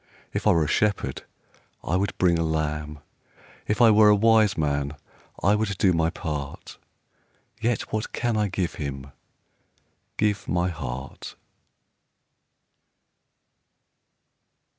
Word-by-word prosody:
If - - -1
I - - +7
were 80 - +3
a - - -2
shepherd 95 -7 0 0.6
I 85 - -1
would 100 +2 -1
bring 85 -2 +3
a - - +1
lamb; 75 -2 -2 0.7
If 105 +3 +2
I 115 - +8
were 105 0 +6
a 105 - +6
wise 110 0 +4
man, 70 -1 -1 0.5
I 100 - +4
would 105 -2 -1
do 95 -1 +3
my 80 -1 +2
part, 75 -5 -6 0.4
— 110 - -38
Yet 115 -2 -1
what 110 0 -1
I - - -7
can 120 -2 0
I 105 -1 +1
give 95 -3 -2
Him, 70 -1 -5 1.1
Give 105 -1 0
my 90 +1 0
heart. 70 -5 -7
90 Hz, 130 wpm, -25 LUFS, 75-105 Hz, 1.1 s, I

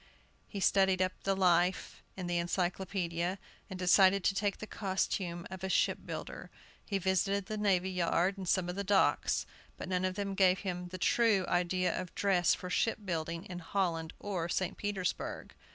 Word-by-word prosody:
He 200 - -6
studied 190 -1 +3
up 185 0 +2
the 195 0 +2
life 180 -1 +2 0.2
in 185 - -4
the 175 0 0
Encyclopædia, 175 0 -1 0.3
and 190 - -6
decided 190 +1 +5
to 195 - +3
take 200 0 -1
the - - -7
costume 190 -4 -2
of 190 -1 -7
a 190 - -2
ship - - +2
builder. - - -6 0.3
He 200 - -2
visited 190 +1 +1
the 215 - -4
navy 190 -3 +1
yard 180 +1 +1
and 190 -3 -5
some 185 -2 +2
of 180 - -4
the 200 - -2
docks; 200 0 +2 0.3
but - - -6
none 180 0 0
of 185 0 -1
them 200 -1 -3
gave 190 -1 +4
him 180 -2 -4
the 185 +1 -7
true 210 0 +3
idea 180 +1 +1
of 180 -2 -6
dress 190 -4 +3
for 180 - -7
ship 215 +3 0
building 165 -1 -3
in 180 -1 -7
Holland 165 -2 -2
or 180 -5 -3
St. 185 +2 -1
Petersburg. 205 -3 -3
185 Hz, 180 wpm, -32 LUFS, 175-195 Hz, 0.3 s, decided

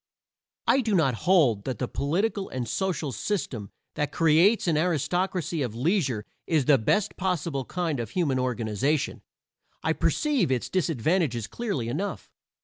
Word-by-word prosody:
I 270 - +4
do 220 -4 0
not 145 -7 +3
hold 125 - +3
that 130 -4 -3
the 125 - -2
political 190 - -1
and 125 -2 -4
social 155 - -1
system 125 - -3 0.2
that 150 -1 -2
creates 170 +7 +4
an 165 - +3
aristocracy 175 +1 0
of 120 -5 -2
leisure 130 - 0 0.2
is 155 -5 +2
the 140 -1 +5
best 200 - +1
possible 165 -7 -1
kind 165 -5 -2
of 115 -3 -3
human 140 -4 0
organization; 125 +3 -1 0.6
I - - +2
perceive 280 - +1
its 125 -2 -1
disadvantages 160 - 0
clearly 200 - -3
enough. 195 +12 -4
155 Hz, 145 wpm, -26 LUFS, 125-185 Hz, 0.6 s, the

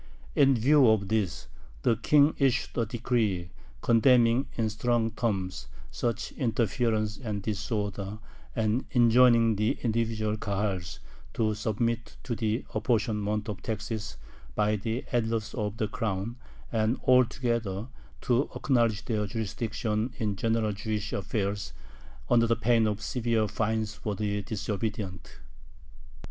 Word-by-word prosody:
In 135 -2 +5
view 135 +3 +5
of 100 -3 +2
this, 95 -10 -1 0.4
the 115 - +4
King 145 +6 +4
issued 135 -3 +1
a 115 -2 0
decree 110 -7 -1 0.3
condemning 120 +2 +4
in 110 -2 0
strong 115 +1 +1
terms 95 - -2 0.2
"such 120 -2 -2
interference 115 -2 0
and 105 -6 -4
disorder," 105 -1 -3 0.4
and 110 +3 +1
enjoining 120 -2 +5
the 105 +2 +1
individual 110 -2 0
Kahals 100 -4 -2 0.4
to 110 -1 +1
submit 115 +2 -2
to 120 - -2
the 110 +2 -1
apportionment 105 -2 0
of 105 -3 -5
taxes 110 -1 -4 0.4
by 105 0 +2
the 110 +4 -3
Elders 115 -3 0
of 105 -3 -3
the 110 - 0
Crown, 105 0 -3 0.4
and 110 +2 +1
altogether 115 -4 +2 0.3
to 125 +3 +1
acknowledge 115 -6 +1
their 105 -3 -1
jurisdiction 110 +2 -2
in 105 -2 -1
general 115 +1 +1
Jewish 105 +1 -3
affairs, 100 0 -2 0.5
under 115 -1 +4
the 115 - +3
pain 115 0 +3
of 105 0 -2
severe 115 -2 0
fines 110 0 -1
for 105 0 -4
the 105 0 -1
disobedient. 105 -3 -4
110 Hz, 125 wpm, -28 LUFS, 105-115 Hz, 0.5 s, In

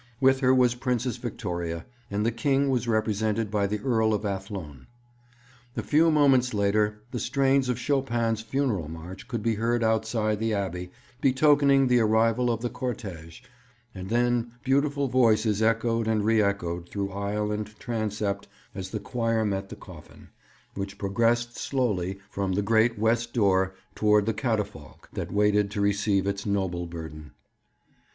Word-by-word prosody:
With 135 0 +4
her 130 -1 +3
was 125 -2 +4
Princess 125 -1 -2
Victoria; 85 -8 -4 0.2
and 105 +1 -1
the 115 - +2
King 135 +4 +1
was 125 -2 0
represented 110 -1 0
by 100 -2 +1
the 105 +2 -2
Earl 110 -4 +2
of 105 - -4
Athlone. 95 - -5 0.9
A - - -1
few 160 +3 +4
moments 135 -6 +3
later 105 +1 +1
the 120 - -3
strains 135 +2 +2
of 125 - 0
Chopin's 120 -5 0
funeral 115 - -1
march 85 +4 -9
could 115 -4 -4
be 115 -1 +2
heard 115 +2 0
outside 110 -1 0
the 110 -1 0
Abbey, 90 -2 -3 0.3
betokening 140 0 +4
the 125 -1 +4
arrival 115 +2 +2
of 115 -1 -1
the 120 - -1
cortège; 95 -10 -6 0.5
and 95 0 -7
then 120 0 +1
beautiful 140 +1 +1
voices 110 -4 +3
echoed 115 0 +1
and 110 -2 +1
re 110 0 +4
echoed 90 -4 -2
through 100 -1 -3
aisle 105 +2 -2
and 105 0 -5
transept 105 -3 -3 0.3
as 95 -1 -6
the 110 - -4
choir 115 +1 -1
met 100 -1 -2
the - - -7
coffin, - - -14 0.4
which 100 0 -5
progressed 115 +4 +1
slowly 100 -9 -1
from 95 -1 -1
the 100 +2 0
great 115 +2 +3
west 115 +2 +1
door 95 -3 +2 0.2
towards 105 -1 +3
the 110 - 0
catafalque 105 - -3
that - - -4
waited 105 0 +2
to 105 0 -4
receive 100 -1 +1
its 100 0 -2
noble 95 -4 -1
burden. 80 -3 -9
110 Hz, 155 wpm, -26 LUFS, 100-120 Hz, 0.9 s, With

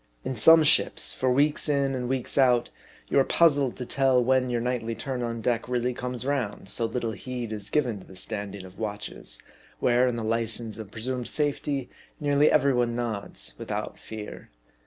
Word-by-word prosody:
In 130 - -2
some 160 +8 +7
ships, 155 +1 +3
for 130 -1 0
weeks 145 +4 +2
in 140 -2 +1
and 125 -1 -3
weeks 130 -1 0
out, 125 -3 +3 0.4
you - - +3
are - - +6
puzzled 145 -5 +3
to 125 - -5
iell 130 -1 +3
when 130 0 +2
your 120 -1 0
nightly 115 -1 -2
turn 125 +2 -4
on 115 -1 -3
deck 120 +1 -1
really 125 0 0
comes 125 0 -5
round; 125 -9 -2
so 115 - -1
little 115 0 -2
heed 120 +2 -5
is 105 -1 -5
given 125 -9 0
to - - -15
the 95 - -13
standing 100 -1 -4
of 95 0 -14
watches, 105 -2 -5 0.4
where 125 +1 +3
in 125 - 0
the 115 - -3
license 115 0 0
of 110 -3 -7
presumed 125 +3 -4
safety, 145 -3 -1 0.3
nearly 145 0 +3
every 140 -1 +4
one 120 -1 +1
nods 110 - -4
without - - -4
fear. 110 -1 -9
125 Hz, 185 wpm, -26 LUFS, 115-135 Hz, 0.4 s, some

